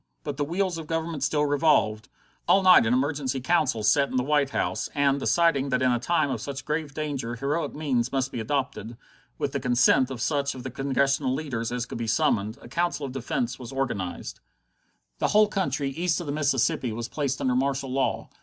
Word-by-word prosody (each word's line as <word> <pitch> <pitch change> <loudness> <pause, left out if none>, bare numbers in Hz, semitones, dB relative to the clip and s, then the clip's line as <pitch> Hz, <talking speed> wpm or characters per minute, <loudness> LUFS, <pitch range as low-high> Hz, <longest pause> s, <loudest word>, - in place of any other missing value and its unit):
But 145 -3 -4
the 145 - 0
wheels 175 +2 -1
of 160 - -8
government 165 -2 -3
still 150 +1 +1
revolved. 140 -8 +2 0.4
All 195 - +5
night 185 -11 +7
an 115 - +2
emergency 135 -1 -1
council 130 -5 +1
sat 140 +6 +3
in - - -5
the 125 - +2
White 145 0 +2
House, - - -2
and, 140 -1 +2
deciding 140 -3 +2
that 125 -1 +1
in 130 - +4
a 120 - +1
time 155 +1 +1
of 120 -5 -3
such 140 +1 -6
grave 150 -2 -3
danger 140 -6 -3
heroic 140 +7 -2
means 130 -5 0
must 135 -1 -1
be - - -4
adopted, 120 -2 -3 0.4
with 140 - -2
the 140 - -2
consent 125 +1 +3
of 130 -3 -6
such 140 +1 0
of 125 - -8
the 130 - -5
Congressional 135 0 0
leaders 130 -7 -3
as 125 0 -2
could - - -7
be 115 - -3
summoned, 105 0 +1
a - - -10
Council 170 +2 -1
of 135 - -5
Defence 125 -1 -3
was 120 -2 -8
organized. 120 -9 -3 0.8
The - - +2
whole 215 0 +5
country 185 -9 -1
east 170 +4 0
of 175 - -5
the 145 - -3
Mississippi 135 -4 +1
was 115 +1 -4
placed 140 -2 -2
under 130 - +1
martial 135 0 -1
law. 135 +1 -1
135 Hz, 205 wpm, -26 LUFS, 125-150 Hz, 0.8 s, night